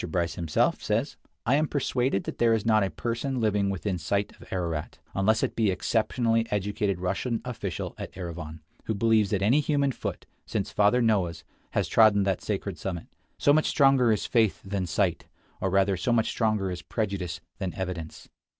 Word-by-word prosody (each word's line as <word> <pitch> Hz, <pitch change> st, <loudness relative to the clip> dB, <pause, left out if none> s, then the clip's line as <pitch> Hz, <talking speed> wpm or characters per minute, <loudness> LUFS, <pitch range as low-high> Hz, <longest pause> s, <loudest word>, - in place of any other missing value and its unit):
Bryce 85 Hz, 0 st, 0 dB
himself 80 Hz, -3 st, +1 dB
says: -, -, -1 dB, 0.3 s
"I 125 Hz, -, +3 dB
am 155 Hz, +2 st, +3 dB
persuaded 130 Hz, -7 st, 0 dB
that -, -, -6 dB
there 115 Hz, -1 st, +4 dB
is 110 Hz, -, -3 dB
not 110 Hz, -1 st, +4 dB
a 95 Hz, -, 0 dB
person 120 Hz, -, -2 dB
living 105 Hz, -3 st, +1 dB
within 95 Hz, -1 st, -2 dB
sight 100 Hz, +5 st, -1 dB
of -, -, -16 dB
Ararat, 85 Hz, -5 st, -3 dB, 0.2 s
unless 110 Hz, +3 st, +2 dB
it -, -, -1 dB
be 110 Hz, -2 st, +2 dB
some 95 Hz, -, +2 dB
exceptionally 115 Hz, +2 st, +1 dB
educated 100 Hz, -2 st, -1 dB
Russian 100 Hz, +6 st, -1 dB
official 100 Hz, -9 st, -4 dB
at -, -, -6 dB
Erivan, 80 Hz, -4 st, -7 dB, 0.2 s
who 110 Hz, -, -1 dB
believes 110 Hz, -1 st, +3 dB
that 100 Hz, -1 st, 0 dB
any 120 Hz, +9 st, +4 dB
human 140 Hz, -2 st, +1 dB
foot, -, -, -5 dB, 0.2 s
since -, -, -2 dB
Father 105 Hz, +4 st, +3 dB
Noah' 105 Hz, -6 st, +3 dB
s, 85 Hz, -1 st, -10 dB, 0.3 s
has -, -, +1 dB
trodden 105 Hz, -3 st, +5 dB
that 95 Hz, -2 st, 0 dB
sacred 100 Hz, -3 st, -3 dB
summit. 90 Hz, -4 st, -4 dB, 0.3 s
So 145 Hz, -, +4 dB
much 155 Hz, +1 st, +3 dB
stronger 135 Hz, -5 st, +4 dB
is 105 Hz, -, 0 dB
faith 110 Hz, -4 st, +2 dB
than 95 Hz, -2 st, -2 dB
sight; 80 Hz, -, 0 dB, 0.3 s
or 95 Hz, -, +1 dB
rather 95 Hz, +1 st, +3 dB
so 90 Hz, +7 st, -1 dB
much 115 Hz, -2 st, +2 dB
stronger 110 Hz, -4 st, 0 dB
is 90 Hz, -, -5 dB
prejudice 95 Hz, -6 st, -3 dB, 0.2 s
than 95 Hz, -4 st, -3 dB
evidence." 90 Hz, -4 st, -5 dB
100 Hz, 185 wpm, -27 LUFS, 95-115 Hz, 0.3 s, trodden